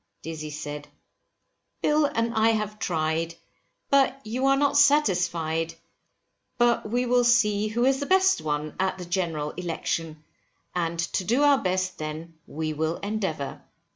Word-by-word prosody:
Dizzy 155 -1 -6
said, 150 -1 -6 1.0
Bill 300 0 +3
and 230 -4 -1
I 220 0 +3
have 210 -1 -3
tried, 165 -1 -1 0.6
but 275 -1 +3
you 250 +5 -1
are 275 0 +4
not 285 0 +2
satisfied, 175 - +2 0.8
but 240 -3 +2
we 245 +3 0
will 245 0 +3
see 215 -3 +3
who 235 +3 0
is 270 0 +3
the 285 - -3
best 380 0 +4
one, 150 0 -3
at 190 0 0
the 180 - -7
General 165 -4 -2
Election, 165 -2 -4 0.5
and 170 -1 -1
to 165 +3 -1
do 240 +9 +2
our 285 -2 +5
best 185 0 -1
then 155 +2 -6
we 155 +1 -3
will 160 +2 -1
endeavour. 190 -9 -3
185 Hz, 145 wpm, -26 LUFS, 160-240 Hz, 1.0 s, our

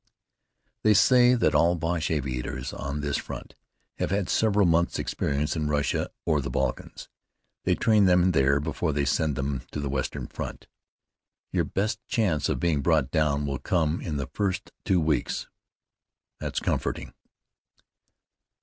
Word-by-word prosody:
"They 110 -1 +4
say 125 +3 +6
that 85 -9 +2
all 85 +3 +4
the - - -7
Boche 80 0 -1
aviators 65 -3 -3
on 70 +2 -4
this 70 -1 -1
front - - -7 0.5
have - - 0
had 95 -2 -1
several 105 -1 +3
months' 85 0 +2
experience 75 +2 -1
in 75 -2 -1
Russia 75 -1 0 0.2
or 75 -3 +2
the 65 - -4
Balkans. - - -3 0.6
They - - +3
train 110 -3 +4
them 90 0 +4
there 70 -3 +3
before 75 +2 -2
they 70 0 0
send 75 0 +1
them 70 0 -2
to - - -4
the 70 -1 -2
Western 65 -1 -2
Front." - - -7 0.9
"Your - - +1
best 110 +4 -2
chance 90 -11 +1
of - - -1
being 80 -5 +1
brought 75 -3 +2
down 75 -3 +1
will 70 -1 -2
come 80 -1 0
in 75 -4 -3
the 70 - -2
first 95 -2 -2
two 95 -2 +3
weeks." 80 -2 0 0.9
"That's - - -2
comforting." - - -2
80 Hz, 155 wpm, -26 LUFS, 70-90 Hz, 0.9 s, say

